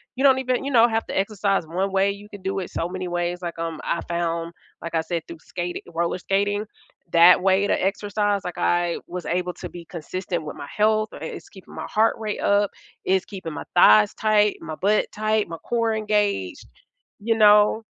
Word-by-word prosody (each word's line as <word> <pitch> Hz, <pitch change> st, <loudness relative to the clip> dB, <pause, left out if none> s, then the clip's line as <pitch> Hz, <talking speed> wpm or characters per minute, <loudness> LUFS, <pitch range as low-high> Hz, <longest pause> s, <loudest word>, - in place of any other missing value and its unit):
you 265 Hz, -, -2 dB
don't 265 Hz, -2 st, +6 dB
even 255 Hz, 0 st, -1 dB
you 280 Hz, -, -2 dB
know, 235 Hz, -2 st, +6 dB
have 225 Hz, -1 st, -1 dB
to -, -, -4 dB
exercise 195 Hz, -2 st, 0 dB
1 185 Hz, +4 st, -2 dB
way, 195 Hz, +1 st, +2 dB
you 200 Hz, +1 st, -10 dB
can 205 Hz, -2 st, -11 dB
do 195 Hz, +1 st, -3 dB
it 185 Hz, -, -5 dB
so 170 Hz, -, -2 dB
many 185 Hz, 0 st, -4 dB
ways, 175 Hz, 0 st, -2 dB
like, 170 Hz, -1 st, -5 dB
um, 165 Hz, -1 st, -4 dB
I 170 Hz, -, -1 dB
found 170 Hz, -1 st, -2 dB, 0.3 s
like 170 Hz, -, -6 dB
I 165 Hz, -, +2 dB
said, 165 Hz, 0 st, -3 dB
through 170 Hz, -, -9 dB
skati 175 Hz, +2 st, -5 dB
roller 170 Hz, +2 st, -1 dB
skating, 205 Hz, +3 st, 0 dB, 0.5 s
that 175 Hz, +2 st, +7 dB
way 195 Hz, +1 st, +3 dB
to -, -, 0 dB
exercise, 205 Hz, +1 st, 0 dB
like 180 Hz, -, -6 dB
I 175 Hz, -1 st, +1 dB
was 180 Hz, 0 st, -6 dB
able 180 Hz, +1 st, -1 dB
to -, -, -8 dB
be 175 Hz, -1 st, -10 dB
consistent 175 Hz, +1 st, -5 dB
with 150 Hz, -, -7 dB
my 140 Hz, -, -8 dB
health, 215 Hz, 0 st, +2 dB
uh, -, -, -8 dB
i -, -, -4 dB
it's -, -, -8 dB
keeping 190 Hz, -, -14 dB
my -, -, -5 dB
heart 220 Hz, +1 st, +2 dB
rate 215 Hz, -2 st, -3 dB
up, 200 Hz, 0 st, +2 dB, 0.3 s
it's 190 Hz, 0 st, +2 dB
keeping 185 Hz, -5 st, -7 dB
my -, -, -6 dB
thighs 205 Hz, +3 st, +6 dB
tight, 210 Hz, -1 st, +2 dB
my 160 Hz, -1 st, -6 dB
butt 205 Hz, +5 st, +2 dB
tight, 215 Hz, 0 st, 0 dB
my 165 Hz, -1 st, -7 dB
core 230 Hz, +5 st, -1 dB
engaged, 210 Hz, -, -1 dB, 0.5 s
you 225 Hz, +2 st, 0 dB
know? 210 Hz, +1 st, +5 dB
195 Hz, 210 wpm, -23 LUFS, 175-210 Hz, 0.5 s, that